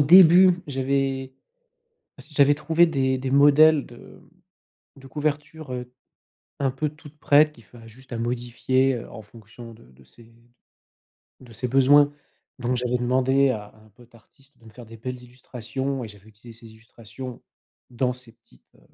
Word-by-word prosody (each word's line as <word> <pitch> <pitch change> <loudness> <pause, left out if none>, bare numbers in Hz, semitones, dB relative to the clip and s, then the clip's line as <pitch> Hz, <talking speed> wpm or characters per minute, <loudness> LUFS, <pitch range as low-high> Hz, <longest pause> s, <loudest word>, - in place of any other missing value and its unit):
début 180 +3 +7
j'avais 135 -1 -2 1.0
j'avais 145 -1 +4
trouvé 165 +3 +2
des 130 -4 -1
des 130 0 -4
modèles 145 +2 +5
de 120 - -15
m - - -17 0.7
de 135 - -14
couvertures, 150 0 -4
heu, 125 0 -7 0.7
un 135 -2 0
peu 150 +3 -3
toutes 150 0 -17
prêtes 150 +2 +4
qui 115 - -18
fa 115 0 -17
juste 130 +4 -18
à 115 - -4
modifier, 125 +2 -1
heu, 115 - -8
en 110 - -10
fonction 115 +2 -14
de 115 - -18
de 65 +1 -21
ses 115 - -18
d 115 +1 -22 1.1
de 120 -3 -15
ses 125 +3 -4
besoins 145 +3 +4 0.5
donc 125 0 -2
j'avais 125 0 -1
demandé 130 +2 +1
à 105 -3 -6
un 110 - -22
pote 120 +3 -22
artiste 135 +4 -24
de 115 - -24
me 110 - -14
faire 120 +1 -13
des 115 0 -13
belles 125 +2 -7
illustrations 130 +2 -6
et - - -9
j'avais 105 0 -17
utilisé 110 +2 -16
ces 110 - -14
illustrations 115 +3 -11 0.5
dans 125 +1 -1
ces 125 -2 -13
petites, 115 - -28
heu, - - -26
130 Hz, 170 wpm, -23 LUFS, 115-140 Hz, 1.1 s, début